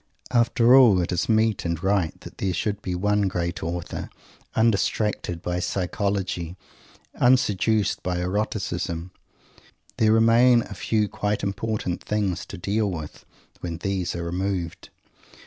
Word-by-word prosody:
After 120 Hz, 0 st, +4 dB
all, 120 Hz, -8 st, +7 dB
it 85 Hz, -, -1 dB
is 90 Hz, +3 st, -1 dB
meet 110 Hz, -1 st, +2 dB
and 85 Hz, 0 st, -3 dB
right 95 Hz, -4 st, +1 dB
that -, -, -12 dB
there 95 Hz, -2 st, -1 dB
should 105 Hz, +4 st, -2 dB
be 90 Hz, -2 st, -3 dB
one 105 Hz, +2 st, +1 dB
great 85 Hz, -1 st, -2 dB
author, 85 Hz, +1 st, -4 dB, 0.5 s
undistracted 105 Hz, -5 st, 0 dB
by 90 Hz, 0 st, -1 dB
psychology 90 Hz, -1 st, -2 dB, 0.6 s
unseduced 110 Hz, -4 st, +2 dB
by 90 Hz, -1 st, -2 dB
eroticism. 90 Hz, -2 st, -2 dB, 0.9 s
There 110 Hz, -1 st, +4 dB
remain 115 Hz, +2 st, +5 dB
a 100 Hz, -, -9 dB
few 105 Hz, +2 st, 0 dB
quite 105 Hz, 0 st, -2 dB
important 100 Hz, -2 st, -2 dB
things 100 Hz, -4 st, -1 dB
to 100 Hz, -, -8 dB
deal 100 Hz, +3 st, 0 dB
with, 80 Hz, -5 st, -7 dB, 0.3 s
when 85 Hz, -2 st, -4 dB
these 95 Hz, -1 st, -2 dB
are 85 Hz, -, -3 dB
removed! 90 Hz, -1 st, -3 dB
100 Hz, 130 wpm, -24 LUFS, 90-110 Hz, 0.9 s, all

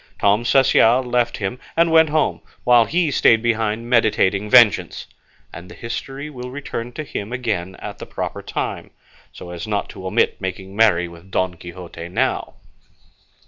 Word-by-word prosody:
Tom 105 Hz, +3 st, +2 dB
Cecial 130 Hz, -1 st, +4 dB
left 120 Hz, -1 st, 0 dB
him 100 Hz, +4 st, -4 dB, 0.2 s
and 170 Hz, 0 st, +4 dB
went 160 Hz, -1 st, +5 dB
home, 155 Hz, 0 st, 0 dB, 0.2 s
while 120 Hz, -2 st, +5 dB
he 165 Hz, +5 st, 0 dB
stayed 115 Hz, -4 st, +4 dB
behind 115 Hz, 0 st, -1 dB
meditating 105 Hz, -4 st, +2 dB
vengeance; 120 Hz, -4 st, +4 dB, 0.5 s
and 90 Hz, +1 st, -10 dB
the -, -, -11 dB
history 135 Hz, +4 st, -6 dB
will 125 Hz, -4 st, -8 dB
return 125 Hz, -3 st, -6 dB
to 155 Hz, -, -5 dB
him 105 Hz, -6 st, -6 dB
again 110 Hz, -7 st, -3 dB
at -, -, -8 dB
the -, -, -8 dB
proper -, -, -5 dB
time, -, -, -4 dB, 0.4 s
so 90 Hz, -, -10 dB
as 85 Hz, +3 st, -6 dB
not 105 Hz, -1 st, -2 dB
to 95 Hz, -, -8 dB
omit -, -, +1 dB
making 95 Hz, +1 st, -6 dB
merry 100 Hz, -6 st, +3 dB
with 85 Hz, +2 st, -14 dB
Don 95 Hz, -1 st, 0 dB
Quixote 85 Hz, -1 st, -9 dB
now. 90 Hz, -, -1 dB
115 Hz, 160 wpm, -20 LUFS, 95-125 Hz, 0.5 s, went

